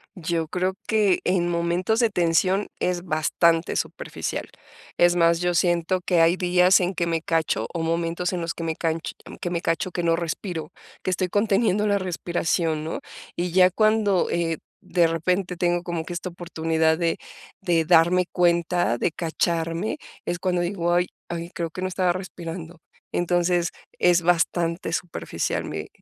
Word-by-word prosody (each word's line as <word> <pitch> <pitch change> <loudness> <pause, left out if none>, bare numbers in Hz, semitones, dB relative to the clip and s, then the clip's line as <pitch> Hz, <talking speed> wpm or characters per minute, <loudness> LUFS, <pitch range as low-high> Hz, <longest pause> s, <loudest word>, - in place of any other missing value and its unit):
Yo 165 -2 -2
creo 185 +3 -1
que 210 -4 +3
en 175 -1 +1
momentos 175 +6 0
de 230 -3 +3
tensión 185 +3 +2
es 180 -1 -1
bastante 165 +1 +1
superficial, - - -4 0.5
es 175 0 +5
más, 170 -1 +4
yo 175 -1 0
siento 175 +2 +1
que 175 -2 +2
hay 165 +2 +5
días 180 +1 +4
en 180 +2 0
que 170 -1 -1
me 165 -1 -1
cacho, 160 -9 0
o 165 - -2
momentos 170 +2 -1
en 180 - -2
los 165 0 -2
que 165 - -6
me 160 -1 -2
canch 165 0 -2 0.3
que 175 - -2
me 170 -1 -2
cacho, 165 +2 0
que 175 0 -3
no 165 -1 +3
respiro, 170 -1 -4 0.3
que - - -2
estoy 185 0 0
conteniendo 210 0 +2
la 200 0 +3
respiración, 170 -3 -1
¿no?, 160 - -4 0.4
y 175 0 -2
ya 185 0 +6
cuando, 215 -2 +2
eh, 165 -2 -1 0.2
de 175 -2 +2
repente 180 +3 -1
tengo 175 0 +1
como 170 -2 -4
que 175 - -6
esta 180 +1 -4
oportunidad 160 -2 0
de 165 -1 +1 0.4
de 170 -4 +2
darme 175 +2 +5
cuenta, 170 -6 +2
de 170 - +1
cacharme, 165 - -1 0.3
es 175 - -1
cuando 180 -1 0
digo: 175 -1 0
"Ay 175 +1 +2 0.2
ay, 170 0 -4
creo 165 -2 -3
que 185 - -7
no 185 - 0
estaba 180 -1 +1
respirando", 170 -2 -7 0.3
entonces, 175 0 +1 0.3
es 175 0 +4
bastante 170 0 +1
superficial 175 -1 -2
mi - - -5
175 Hz, 165 wpm, -24 LUFS, 165-180 Hz, 0.5 s, ya